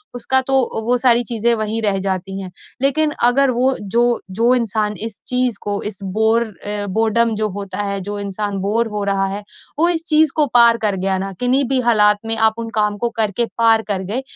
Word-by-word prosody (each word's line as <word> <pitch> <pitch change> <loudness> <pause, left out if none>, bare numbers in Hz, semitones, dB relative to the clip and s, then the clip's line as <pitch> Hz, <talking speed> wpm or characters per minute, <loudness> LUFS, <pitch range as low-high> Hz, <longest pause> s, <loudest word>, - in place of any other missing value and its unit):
उसका 260 +2 +3
तो 265 -4 0
वो 245 +2 +2
सारी 245 -1 +3
चीज़ें 235 0 0
वहीं 220 +1 -2
रह 200 -2 +1
जाती 190 0 -4
हैं 185 -1 -8 0.3
लेकिन 300 +3 +2
अगर 265 +2 +4
वो 255 +2 +1
जो 205 +4 0 0.4
जो 240 +2 +4
इंसान 215 -3 -1
इस 220 - -8
चीज़ 250 -3 +1
को 205 -1 -3
इस 210 -2 -4 0.2
बोर 220 +1 +3 0.2
अ 205 0 -3
बोर्डम 225 +1 +2
जो 215 0 -1
होता 200 0 -4
है 200 -1 -3
जो 205 +2 -5
इंसान 200 0 -3
बोर 225 +4 0
हो 205 - -2
रहा 195 -1 0
है, 200 +2 -5 0.4
वो 340 +2 +3
इस 330 -2 -1
चीज़ 310 -2 +3
को 305 - +3
पार 235 -1 +6
कर 205 -2 +1
गया 190 0 -1
ना 195 +1 -4
किन्ही 255 +3 +2
भी 265 -1 +2
हालात 210 -2 +4
में 225 0 0
आप 220 0 +4
उन 230 0 -5
काम 210 -1 0
को 235 +3 -1
करके 220 +2 +1
पार 225 -1 +4
कर 190 -2 -1
गए, 250 +4 -1
220 Hz, 215 wpm, -18 LUFS, 205-245 Hz, 0.4 s, पार